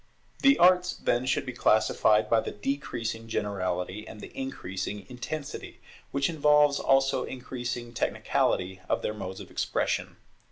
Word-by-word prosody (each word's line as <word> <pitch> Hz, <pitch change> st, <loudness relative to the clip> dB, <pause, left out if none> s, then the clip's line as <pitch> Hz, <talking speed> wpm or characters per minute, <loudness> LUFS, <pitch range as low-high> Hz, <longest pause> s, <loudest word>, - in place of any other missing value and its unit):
The 275 Hz, 0 st, +6 dB
arts, 180 Hz, 0 st, +5 dB
then, 125 Hz, +2 st, 0 dB
should -, -, +1 dB
be 125 Hz, -, -5 dB
classified 110 Hz, -1 st, +3 dB
by 115 Hz, +1 st, +4 dB
the -, -, -3 dB
decreasing 115 Hz, -2 st, -3 dB
generality 95 Hz, -1 st, -2 dB
and 110 Hz, -, -10 dB
the -, -, -11 dB
increasing 100 Hz, -6 st, -4 dB
intensity, 140 Hz, +4 st, -6 dB, 0.3 s
which 140 Hz, 0 st, +1 dB
involves 150 Hz, -2 st, +4 dB
also 135 Hz, 0 st, +3 dB
increasing 120 Hz, -2 st, -5 dB
technicality, 95 Hz, -4 st, 0 dB
of -, -, 0 dB
their 105 Hz, -, -1 dB
modes 95 Hz, -3 st, -6 dB
of -, -, -10 dB
expression. -, -, -1 dB
120 Hz, 135 wpm, -28 LUFS, 105-140 Hz, 0.3 s, The